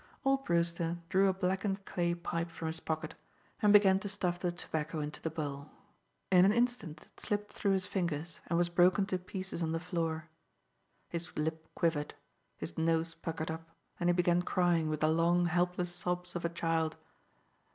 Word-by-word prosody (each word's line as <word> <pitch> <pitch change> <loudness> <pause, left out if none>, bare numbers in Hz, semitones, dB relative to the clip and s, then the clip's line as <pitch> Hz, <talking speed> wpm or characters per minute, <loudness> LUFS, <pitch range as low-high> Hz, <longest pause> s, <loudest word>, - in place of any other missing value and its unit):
Old 270 0 +2
Brewster 170 0 +1
drew 190 +4 +4
a 190 - +3
blackened 195 +1 -1
clay 175 -1 0
pipe 170 0 -3
from 165 - -7
his 160 0 -2
pocket, 160 -1 -3 0.5
and 210 -2 +5
began 195 -2 +7
to 205 - -5
stuff 180 -3 -1
the 180 - 0
tobacco 160 -2 -3
into 150 0 -4
the 160 - -1
bowl. 145 -2 -5 0.6
In 180 -1 +7
an 195 - +6
instant 235 -8 0
it - - -21
slipped 205 0 -2
through 200 - +1
his 190 -1 +1
fingers, 170 -4 -2
and 170 - +1
was 175 0 +3
broken 180 +3 +4
to 185 -2 -1
pieces 185 -1 -5
on 160 -1 0
the 165 - 0
floor. 165 -2 -2 0.8
His 170 0 -4
lip 160 +1 -2
quivered, 155 -3 0 0.4
his - - -5
nose 165 0 +1
puckered 165 -1 -4
up, 165 0 -7 0.3
and 175 - +2
he - - +5
began 175 0 +3
crying 175 -3 +2
with 155 -1 -2
the 155 - +4
long, 170 +2 +3
helpless 175 +1 +1
sobs 180 0 -3
of 175 - -3
a 170 - +1
child. 165 -1 0
175 Hz, 185 wpm, -33 LUFS, 165-185 Hz, 0.8 s, began